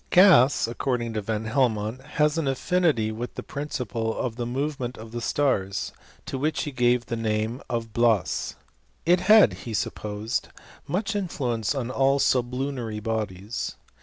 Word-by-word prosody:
Gas, 160 Hz, -, +6 dB
according 120 Hz, -1 st, -2 dB
to 110 Hz, -, -1 dB
Van 110 Hz, +1 st, -2 dB
Helmont, 110 Hz, -1 st, 0 dB
has 150 Hz, +2 st, +1 dB
an 155 Hz, -, -1 dB
affinity 135 Hz, -5 st, +1 dB
with 115 Hz, +3 st, -5 dB
the -, -, -5 dB
principle 125 Hz, -6 st, -3 dB
of 120 Hz, -3 st, -2 dB
the 120 Hz, -1 st, -3 dB
movement 130 Hz, -1 st, -3 dB
of 110 Hz, 0 st, -10 dB
the 120 Hz, 0 st, -4 dB
stars, 100 Hz, -9 st, 0 dB, 0.3 s
to. 135 Hz, -, -4 dB
which 155 Hz, +3 st, 0 dB
he 150 Hz, -, -4 dB
gave 120 Hz, -1 st, +2 dB
the 115 Hz, -, -3 dB
name 110 Hz, +2 st, -1 dB
of 115 Hz, -2 st, -3 dB
hlas. 115 Hz, -5 st, +1 dB, 0.5 s
It 175 Hz, +2 st, +5 dB
had, 195 Hz, -, +6 dB
he 110 Hz, +5 st, -6 dB
sup*, -, -, -1 dB
posed, 105 Hz, +1 st, -3 dB, 0.4 s
much 210 Hz, +4 st, -1 dB
influence 130 Hz, -, -1 dB
on 125 Hz, -2 st, -2 dB
all 135 Hz, +1 st, +3 dB
sublunary 125 Hz, -3 st, 0 dB
bodies. 105 Hz, -1 st, -3 dB
120 Hz, 155 wpm, -26 LUFS, 110-140 Hz, 0.5 s, Gas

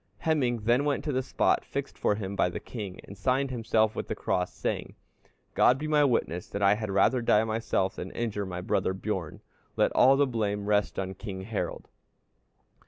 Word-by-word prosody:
Hemingr 130 Hz, -9 st, +1 dB
then 120 Hz, +5 st, +3 dB
went 145 Hz, -1 st, 0 dB
to 150 Hz, -, -1 dB
the 130 Hz, -1 st, 0 dB
spot -, -, +1 dB
fixed -, -, -5 dB
for 105 Hz, -, +1 dB
him 100 Hz, -2 st, -5 dB
by 90 Hz, -, +2 dB
the -, -, -5 dB
king, 100 Hz, -6 st, -7 dB
and 100 Hz, -, -11 dB
signed 130 Hz, +6 st, 0 dB
himself 110 Hz, -2 st, +1 dB
with -, -, -4 dB
the -, -, -3 dB
cross, 90 Hz, 0 st, -1 dB
saying, -, -, -4 dB, 0.6 s
'God 125 Hz, -, +5 dB
be 155 Hz, +3 st, -4 dB
my 150 Hz, -1 st, +4 dB
witness 90 Hz, -, 0 dB
that 100 Hz, -, -3 dB
I 100 Hz, +1 st, +6 dB
had 110 Hz, 0 st, -3 dB
rather 105 Hz, +6 st, +3 dB
die 110 Hz, -2 st, +4 dB
myself 110 Hz, -4 st, -1 dB
than 90 Hz, -, -5 dB
injure 105 Hz, -4 st, -2 dB
my 90 Hz, -1 st, -5 dB
brother 95 Hz, +1 st, 0 dB
Bjorn; 95 Hz, -5 st, -4 dB, 0.3 s
let -, -, +2 dB
all 135 Hz, +1 st, +5 dB
the 145 Hz, -, +4 dB
blame 105 Hz, -5 st, -2 dB
rest 105 Hz, 0 st, +1 dB
on 95 Hz, 0 st, -2 dB
King 95 Hz, -1 st, -7 dB
Harald.' 105 Hz, +2 st, -4 dB
110 Hz, 195 wpm, -28 LUFS, 100-125 Hz, 0.6 s, I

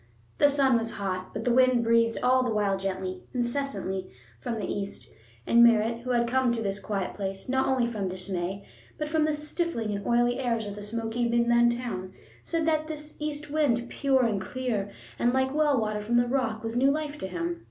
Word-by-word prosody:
The 290 Hz, -, +6 dB
sun 270 Hz, -4 st, +3 dB
was 225 Hz, 0 st, -4 dB
hot, 185 Hz, -2 st, -4 dB
but 220 Hz, +1 st, -5 dB
the 245 Hz, -, +3 dB
wind 255 Hz, -1 st, +4 dB
breathed 230 Hz, 0 st, +3 dB
all 255 Hz, +1 st, +4 dB
the 250 Hz, -, 0 dB
while 205 Hz, -3 st, +1 dB
gently, 190 Hz, -1 st, -4 dB
incessantly, 240 Hz, -7 st, -2 dB, 0.3 s
from 230 Hz, -, -3 dB
the 215 Hz, -, -3 dB
east, 200 Hz, 0 st, -5 dB, 0.3 s
and 235 Hz, 0 st, +6 dB
Merritt, 230 Hz, 0 st, +4 dB
who 250 Hz, +2 st, -8 dB
had 240 Hz, -1 st, +2 dB
come 255 Hz, 0 st, +2 dB
to 230 Hz, -, -2 dB
this 200 Hz, -1 st, -2 dB
quiet 200 Hz, -3 st, -3 dB
place, 195 Hz, -1 st, -5 dB
not 265 Hz, +1 st, +1 dB
only 260 Hz, -2 st, +2 dB
from 215 Hz, -5 st, -2 dB
dismay, 185 Hz, +1 st, -3 dB, 0.3 s
but 300 Hz, -, -2 dB
from 310 Hz, 0 st, +2 dB
the 310 Hz, -, +1 dB
stifling 300 Hz, -, -2 dB
and 200 Hz, -, -5 dB
oily 240 Hz, +1 st, +2 dB
airs 230 Hz, -4 st, 0 dB
of 205 Hz, -, -5 dB
the 205 Hz, -, -8 dB
smoky 230 Hz, +2 st, -2 dB
Midland 235 Hz, 0 st, +3 dB
town, 190 Hz, -7 st, -5 dB, 0.3 s
said 330 Hz, -2 st, -1 dB
that 310 Hz, -1 st, +1 dB
that 305 Hz, -1 st, -7 dB
east 300 Hz, -1 st, -4 dB
wind, 250 Hz, -6 st, +1 dB
pure 270 Hz, -2 st, +2 dB
and 210 Hz, -4 st, 0 dB
clear 215 Hz, -1 st, -2 dB, 0.3 s
and 240 Hz, +1 st, +2 dB
like 265 Hz, 0 st, +1 dB
well 295 Hz, -3 st, +3 dB
water 215 Hz, -1 st, -1 dB
from 235 Hz, +3 st, +1 dB
the 240 Hz, -, +4 dB
rock, 240 Hz, -4 st, -1 dB
was 225 Hz, +1 st, -3 dB
new 265 Hz, +3 st, +4 dB
life 300 Hz, 0 st, -1 dB
to -, -, -3 dB
him. 175 Hz, -2 st, -3 dB
235 Hz, 205 wpm, -27 LUFS, 205-265 Hz, 0.3 s, The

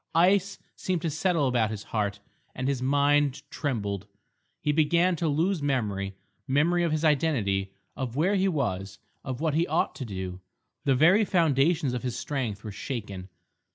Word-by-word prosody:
Ice 195 Hz, +3 st, +3 dB, 0.2 s
seemed 180 Hz, -3 st, -2 dB
to 165 Hz, -, 0 dB
settle 165 Hz, -3 st, +1 dB
about 120 Hz, -4 st, +2 dB
his 110 Hz, -1 st, -5 dB
heart, 100 Hz, -2 st, -2 dB, 0.4 s
and 130 Hz, 0 st, -2 dB
his 135 Hz, -2 st, 0 dB
mind 145 Hz, +1 st, +2 dB
trembled. 105 Hz, -, -3 dB, 0.5 s
He 150 Hz, -, 0 dB
began 170 Hz, +4 st, +3 dB
to 165 Hz, -, 0 dB
lose 165 Hz, +4 st, +1 dB
memory—memory 130 Hz, -, -1 dB
of 170 Hz, -2 st, +1 dB
his 155 Hz, +1 st, 0 dB
identity, 105 Hz, -11 st, +1 dB, 0.2 s
of 125 Hz, -2 st, -4 dB
where 170 Hz, +8 st, +2 dB
he 195 Hz, -1 st, +2 dB
was, 100 Hz, -, -2 dB, 0.3 s
of 130 Hz, +1 st, -5 dB
what 160 Hz, -2 st, +1 dB
he 165 Hz, +3 st, +2 dB
ought 160 Hz, +3 st, +1 dB
to -, -, -6 dB
do. 95 Hz, -3 st, -5 dB, 0.5 s
The 135 Hz, -2 st, +4 dB
very 175 Hz, -, +5 dB
foundations 160 Hz, -6 st, +2 dB
of 125 Hz, -, -2 dB
his 125 Hz, -2 st, -3 dB
strength 120 Hz, -8 st, -3 dB
were 110 Hz, -, -5 dB
shaken. 100 Hz, -4 st, -6 dB
140 Hz, 160 wpm, -27 LUFS, 110-165 Hz, 0.5 s, very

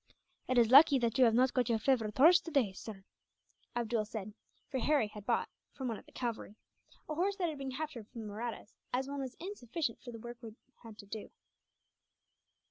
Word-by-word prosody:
"It 255 Hz, -, +1 dB
is 235 Hz, -1 st, +5 dB
lucky 280 Hz, +1 st, +9 dB
that 235 Hz, 0 st, 0 dB
you 255 Hz, -, +8 dB
have 225 Hz, -1 st, +4 dB
not 255 Hz, +1 st, +4 dB
got 250 Hz, -3 st, +1 dB
your 230 Hz, -, +3 dB
favourite 220 Hz, -3 st, +1 dB
horse 340 Hz, +6 st, +7 dB
today, 275 Hz, -, 0 dB
sir," 195 Hz, 0 st, -9 dB, 0.7 s
Abdool 235 Hz, -2 st, 0 dB
said 215 Hz, -2 st, -6 dB, 0.3 s
for 265 Hz, -, -2 dB
Harry 290 Hz, -1 st, +3 dB
had 210 Hz, -1 st, -11 dB
bought, -, -, +1 dB, 0.3 s
from 265 Hz, -2 st, -4 dB
one 225 Hz, -, -3 dB
of -, -, -19 dB
the -, -, -17 dB
cavalry, 235 Hz, -4 st, -4 dB, 0.5 s
a 310 Hz, -, -3 dB
horse 375 Hz, +6 st, 0 dB
that 360 Hz, -4 st, 0 dB
had 300 Hz, -3 st, -6 dB
been 270 Hz, -1 st, -4 dB
captured 285 Hz, -7 st, -5 dB
from 235 Hz, -1 st, -9 dB
the 215 Hz, -, -6 dB
Mahrattas, 225 Hz, -1 st, -6 dB, 0.2 s
as 260 Hz, +2 st, -1 dB
one 280 Hz, 0 st, -4 dB
was 260 Hz, -2 st, -5 dB
insufficient 325 Hz, -, -4 dB
for 245 Hz, -, -8 dB
the 230 Hz, -, -8 dB
work 240 Hz, +1 st, -8 dB
he 225 Hz, -3 st, -9 dB, 0.3 s
had 225 Hz, -3 st, -12 dB
to 205 Hz, -, -11 dB
do. 210 Hz, +1 st, -7 dB
240 Hz, 210 wpm, -33 LUFS, 220-275 Hz, 0.7 s, lucky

